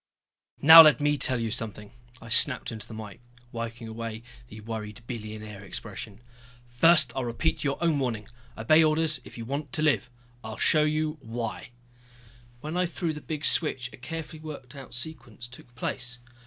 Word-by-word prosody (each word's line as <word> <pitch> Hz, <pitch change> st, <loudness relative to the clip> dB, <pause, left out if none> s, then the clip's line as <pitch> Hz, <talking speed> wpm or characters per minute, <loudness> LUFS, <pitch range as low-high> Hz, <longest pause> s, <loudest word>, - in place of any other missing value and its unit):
"Now 160 Hz, +3 st, +12 dB
let 155 Hz, -5 st, +6 dB
me 145 Hz, 0 st, +2 dB
tell 130 Hz, -2 st, +1 dB
you 115 Hz, -1 st, -2 dB
something," 105 Hz, -3 st, -4 dB, 0.3 s
I 115 Hz, -, -12 dB
snapped 125 Hz, +2 st, +3 dB
into 110 Hz, -3 st, -6 dB
the -, -, -10 dB
mike, 110 Hz, -2 st, -9 dB, 0.3 s
wiping 115 Hz, 0 st, -6 dB
away 115 Hz, 0 st, -6 dB, 0.2 s
the 110 Hz, -2 st, -11 dB
worried 105 Hz, 0 st, -7 dB
billionaire 110 Hz, -3 st, -7 dB
expression. 100 Hz, +2 st, -7 dB, 0.5 s
"First 130 Hz, +1 st, +5 dB
I'll 130 Hz, -, -1 dB
repeat 120 Hz, +7 st, -1 dB
your 140 Hz, -1 st, 0 dB
own 160 Hz, -4 st, +2 dB
warning 115 Hz, -6 st, -2 dB, 0.3 s
obey 155 Hz, +9 st, +5 dB
orders 155 Hz, 0 st, +1 dB
if -, -, -13 dB
you 115 Hz, -, -6 dB
want 140 Hz, +2 st, -4 dB
to 155 Hz, -, -1 dB
live. 140 Hz, -5 st, +2 dB, 0.3 s
I'll 110 Hz, 0 st, -7 dB
show 155 Hz, -1 st, +4 dB
you 155 Hz, 0 st, -1 dB
why 115 Hz, -1 st, -5 dB, 0.5 s
" 120 Hz, 0 st, -26 dB
When 155 Hz, +3 st, -5 dB
I 180 Hz, 0 st, +2 dB
threw 170 Hz, -1 st, -3 dB
the 150 Hz, -, -8 dB
big 155 Hz, 0 st, -4 dB
switch 130 Hz, -6 st, +1 dB
a -, -, -11 dB
carefully 155 Hz, +5 st, -7 dB
worked 145 Hz, -5 st, -9 dB
out 135 Hz, -3 st, -10 dB
sequence 120 Hz, -4 st, -8 dB
took 120 Hz, 0 st, -15 dB
place. 125 Hz, 0 st, -4 dB
120 Hz, 175 wpm, -27 LUFS, 115-150 Hz, 0.5 s, Now